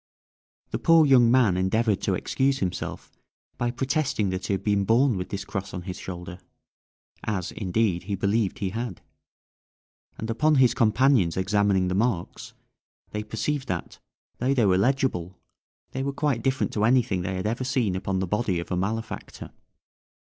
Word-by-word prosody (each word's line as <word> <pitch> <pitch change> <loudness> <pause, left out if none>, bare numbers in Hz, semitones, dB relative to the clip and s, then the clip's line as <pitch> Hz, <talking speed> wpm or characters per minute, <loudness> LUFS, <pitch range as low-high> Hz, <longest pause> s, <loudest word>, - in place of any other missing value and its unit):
The - - -2
poor 165 -2 +5
young 125 -4 +6
man 120 -7 +4
endeavoured 100 +3 +1
to - - 0
excuse 135 0 0
himself 95 -8 -4 0.5
by 120 - +1
protesting 130 - -1
that 95 0 -4
he - - 0
had 95 - -6
been 100 -1 +2
born 120 +4 +3
with 90 -1 -4
this 100 0 -4
cross 95 -1 -5
on 90 - -5
his 90 0 -6
shoulder, 90 0 -7 0.9
as, 95 -5 -2
indeed, 95 -3 -1
he 100 0 -2
believed 100 +1 0
he 95 -3 -2
had; 115 -4 -5 1.2
and 110 - -5
upon 150 +7 +3
his 130 -3 +5
companions 115 -5 +3
examining 100 -1 +2
the 90 - -1
marks, 100 -3 -2 0.6
they 105 - -3
perceived 130 +6 -3
that, 90 -2 -4 0.4
though 130 +3 +1
they 120 -5 +3
were 95 -2 +4
legible, 95 -5 0 0.5
they 130 - -3
were 140 +1 -2
quite 140 -5 0
different 135 +3 0
to 105 - 0
anything 115 -6 +2
they 95 +1 -3
had 95 - -3
ever 115 +4 -1
seen 125 -7 0
upon 95 0 -2
the 95 - 0
body 100 -1 0
of 85 - -7
a - - +1
malefactor. 110 +5 -4
105 Hz, 170 wpm, -25 LUFS, 95-125 Hz, 1.2 s, young